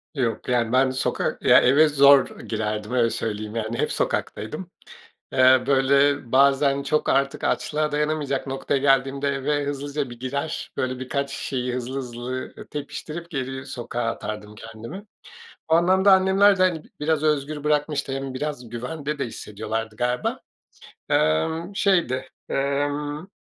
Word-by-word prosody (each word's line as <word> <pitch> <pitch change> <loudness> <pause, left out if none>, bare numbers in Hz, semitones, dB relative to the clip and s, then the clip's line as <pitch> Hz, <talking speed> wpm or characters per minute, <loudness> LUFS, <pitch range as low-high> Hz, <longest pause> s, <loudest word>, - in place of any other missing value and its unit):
Yok, 120 -2 -2
yani, 120 -2 +1
ben 130 +1 +5
bir 130 - -3
sokak, 130 - -1
ya, - - +7
eve 145 +5 +5
zor 140 -1 +5
girerdim. 105 0 -3
Öyle 120 -2 +3
söyleyeyim. 105 -1 -4
Yani, 115 +1 -2
hep - - 0
sokaktaydım. 155 - -3 0.6
Iıı, 130 0 +5
böyle, 140 -1 +3
bazen 140 +1 +4
çok 150 +2 0
artık 135 0 +1
açlığa 150 0 0
dayanamayacak 150 -2 -1
noktaya 135 +1 -1
geldiğimde 135 0 +2
eve 140 +1 -1
hızlıca 145 -1 -3
bir 120 - -10
girer. 130 +3 -4
Böyle, 130 0 -2
birkaç 140 +1 -3
şeyi 125 -3 -3
hızlı 125 +1 -4
hızlı 125 +1 -5 0.2
tepiştirip 155 +3 -6
geri 135 -3 -4
sokağa 120 -2 -4
atardım 105 -2 -4
kendimi. 115 - -9 0.6
O 160 - +4
anlamda 190 +3 +5
annemler 190 +1 +5
de, 185 - +3
hani, 170 -4 +1
b - - -19
biraz 155 0 +1
özgür 150 -1 0
bırakmıştı. 150 -2 0
Hem 135 -1 -4
biraz 145 -4 -4
güvende 145 +5 -5
de - - -1
hissediyorlardı 110 0 -5
galiba. 125 +1 -1 0.7
Imm, 160 - +1
şeydi, 170 -11 +1 0.3
ımm, 145 +4 -1
135 Hz, 140 wpm, -24 LUFS, 125-150 Hz, 0.7 s, ya